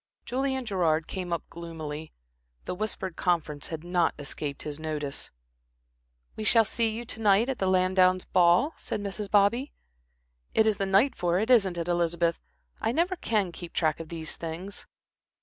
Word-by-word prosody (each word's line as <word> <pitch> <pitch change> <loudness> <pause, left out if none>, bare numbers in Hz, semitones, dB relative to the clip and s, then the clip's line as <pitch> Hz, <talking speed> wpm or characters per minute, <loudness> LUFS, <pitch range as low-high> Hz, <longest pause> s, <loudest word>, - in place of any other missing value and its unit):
Julian 265 0 -1
Gerard 165 -6 +1
came 180 -1 -5
up 170 -2 -1
gloomily. 160 -2 -7 0.5
The - - -3
whispered 190 -2 -3
conference 155 -5 0
had 160 -1 -6
not 175 -1 +1
escaped 145 0 -5
his 150 0 -5
notice. 150 -3 -4 1.1
"We 215 - -5
shall 225 +1 +5
see 230 +1 +1
you 225 +2 -5
to 225 - -6
night 210 +3 +4
at 265 - -2
the 190 - +1
Lansdownes' 185 0 +3
ball," 180 - +4
said - - -4
Mrs. 205 0 -5
Bobby. 215 +7 +3 0.8
"It 220 - +5
is 215 -2 +2
the 195 -2 -1
night 210 +8 +4
for 175 0 +1
it, 220 +6 +1
isn't 195 -7 +4
it, 170 0 -2
Elizabeth? 170 -1 +1 0.4
I - - +1
never 345 +8 +1
can 210 - 0
keep 170 0 -9
track 155 -2 +1
of 165 -1 -7
these 160 -2 -4
things." 170 +5 -6
185 Hz, 165 wpm, -28 LUFS, 165-215 Hz, 1.1 s, shall